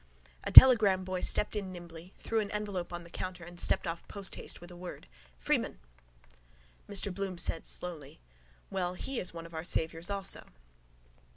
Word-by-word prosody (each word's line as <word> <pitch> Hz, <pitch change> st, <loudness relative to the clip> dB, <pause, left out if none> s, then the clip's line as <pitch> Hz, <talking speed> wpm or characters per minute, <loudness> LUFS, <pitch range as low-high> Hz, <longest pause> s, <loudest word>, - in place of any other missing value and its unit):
A -, -, -3 dB
telegram 210 Hz, -8 st, +9 dB
boy 185 Hz, -1 st, -4 dB
stepped 210 Hz, -, +1 dB
in 195 Hz, -3 st, -4 dB
nimbly, 175 Hz, 0 st, -11 dB
threw 225 Hz, -, -2 dB
an 205 Hz, -2 st, -3 dB
envelope 205 Hz, -4 st, -4 dB
on 175 Hz, 0 st, -6 dB
the 170 Hz, -, -14 dB
counter 185 Hz, -1 st, -6 dB
and 175 Hz, 0 st, -10 dB
stepped -, -, +1 dB
off 165 Hz, 0 st, -6 dB
posthaste 200 Hz, -2 st, -3 dB
with 175 Hz, +1 st, -13 dB
a -, -, -12 dB
word: 180 Hz, 0 st, -10 dB, 0.3 s
—Freeman! -, -, -1 dB, 1.1 s
Mr 200 Hz, -1 st, +1 dB
Bloom 195 Hz, -1 st, -5 dB
said 165 Hz, -, 0 dB
slowly: 160 Hz, -, -6 dB, 0.5 s
—Well, 180 Hz, -2 st, -2 dB
he 270 Hz, +7 st, -5 dB
is 180 Hz, -, -3 dB
one 165 Hz, 0 st, -9 dB
of 165 Hz, -, -13 dB
our 160 Hz, 0 st, -5 dB
saviours 165 Hz, 0 st, 0 dB
also. 200 Hz, -1 st, +1 dB
180 Hz, 170 wpm, -30 LUFS, 170-195 Hz, 1.1 s, telegram